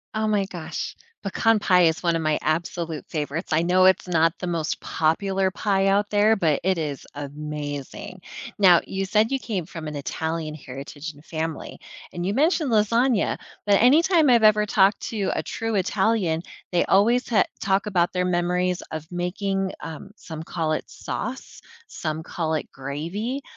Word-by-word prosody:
Oh 215 Hz, 0 st, 0 dB
my 205 Hz, -2 st, +2 dB
gosh. 175 Hz, -4 st, -5 dB, 0.3 s
Pecan 220 Hz, +2 st, +2 dB
pie 180 Hz, -2 st, +4 dB
is 160 Hz, -1 st, +3 dB
one 170 Hz, -2 st, +1 dB
of 165 Hz, -, 0 dB
my 155 Hz, -1 st, +1 dB
absolute 165 Hz, 0 st, -2 dB
favorites, 155 Hz, +2 st, -3 dB
I 155 Hz, +1 st, +3 dB
know 180 Hz, +2 st, +3 dB
it's 190 Hz, -, +3 dB
not 165 Hz, -1 st, +2 dB
the 180 Hz, -, -4 dB
most 170 Hz, -1 st, -2 dB
popular 190 Hz, +4 st, 0 dB
pie 195 Hz, 0 st, +1 dB
out 205 Hz, +1 st, +2 dB
there, 210 Hz, +1 st, +4 dB
but 155 Hz, -6 st, +1 dB
it 185 Hz, -1 st, +2 dB
is 150 Hz, -4 st, -4 dB
amazing. 145 Hz, +3 st, -6 dB, 0.4 s
Now, 180 Hz, -4 st, +7 dB
you 195 Hz, 0 st, -2 dB
said 215 Hz, +3 st, +2 dB
you 270 Hz, -, +1 dB
came 200 Hz, -10 st, -3 dB
from 160 Hz, -3 st, -7 dB
an 150 Hz, -, -5 dB
Italian 160 Hz, +2 st, -3 dB
heritage 140 Hz, +3 st, -8 dB
and 145 Hz, +2 st, -18 dB
family, 160 Hz, -1 st, -4 dB, 0.4 s
and 175 Hz, 0 st, -3 dB
you 195 Hz, -, 0 dB
mentioned 305 Hz, 0 st, +2 dB
lasagna, 230 Hz, +2 st, +2 dB, 0.3 s
but 200 Hz, -1 st, +4 dB
anytime 315 Hz, +5 st, +5 dB
I've 235 Hz, -2 st, +5 dB
ever 210 Hz, 0 st, +5 dB
talked 200 Hz, -2 st, +3 dB
to 205 Hz, -4 st, -1 dB
a -, -, -1 dB
true 225 Hz, -1 st, -3 dB
Italian, 190 Hz, -3 st, +1 dB, 0.3 s
they 175 Hz, -, +2 dB
always 230 Hz, +6 st, +3 dB
ha 220 Hz, -4 st, +4 dB, 0.2 s
talk 195 Hz, +1 st, +1 dB
about 180 Hz, -4 st, +1 dB
their 180 Hz, -, +1 dB
memories 180 Hz, 0 st, 0 dB
of 155 Hz, -1 st, -5 dB
making, 190 Hz, +2 st, -2 dB
um, 160 Hz, +5 st, -8 dB
some 160 Hz, -5 st, -8 dB
call 160 Hz, -1 st, -2 dB
it 155 Hz, -, -2 dB
sauce, -, -, -6 dB, 0.3 s
some 155 Hz, +1 st, -4 dB
call 160 Hz, -1 st, -3 dB
it 155 Hz, -, -3 dB
gravy. 170 Hz, -, -4 dB
180 Hz, 170 wpm, -24 LUFS, 160-205 Hz, 0.4 s, Now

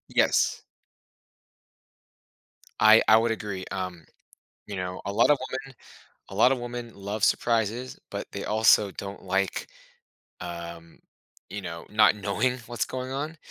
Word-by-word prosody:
Yes. -, -, +3 dB, 2.2 s
I 110 Hz, +1 st, +8 dB
I 110 Hz, -, +8 dB
would 115 Hz, +1 st, +2 dB
agree. 100 Hz, -4 st, -4 dB
Um, 90 Hz, -4 st, -5 dB, 0.6 s
you 100 Hz, -, -6 dB
know, 90 Hz, 0 st, -4 dB
a 100 Hz, -, -3 dB
lot 115 Hz, +7 st, +4 dB
of 145 Hz, -, +5 dB
women 135 Hz, +1 st, -6 dB, 0.6 s
a 95 Hz, -, -8 dB
lot 115 Hz, +5 st, +5 dB
of 135 Hz, -, 0 dB
women 120 Hz, -1 st, -6 dB
love 100 Hz, +2 st, -5 dB
surprises, 115 Hz, +2 st, +1 dB
but -, -, -4 dB
they -, -, -5 dB
also 110 Hz, -1 st, +4 dB
don't 100 Hz, +1 st, -7 dB
like, 95 Hz, +1 st, -1 dB, 0.7 s
um, 85 Hz, -1 st, -8 dB, 0.5 s
you 105 Hz, +1 st, -5 dB
know, 85 Hz, -2 st, -7 dB
not 105 Hz, 0 st, +5 dB
knowing 105 Hz, +5 st, 0 dB
what's 120 Hz, -2 st, -1 dB
going 130 Hz, 0 st, -5 dB
on 150 Hz, +4 st, -4 dB
105 Hz, 140 wpm, -27 LUFS, 95-120 Hz, 2.2 s, I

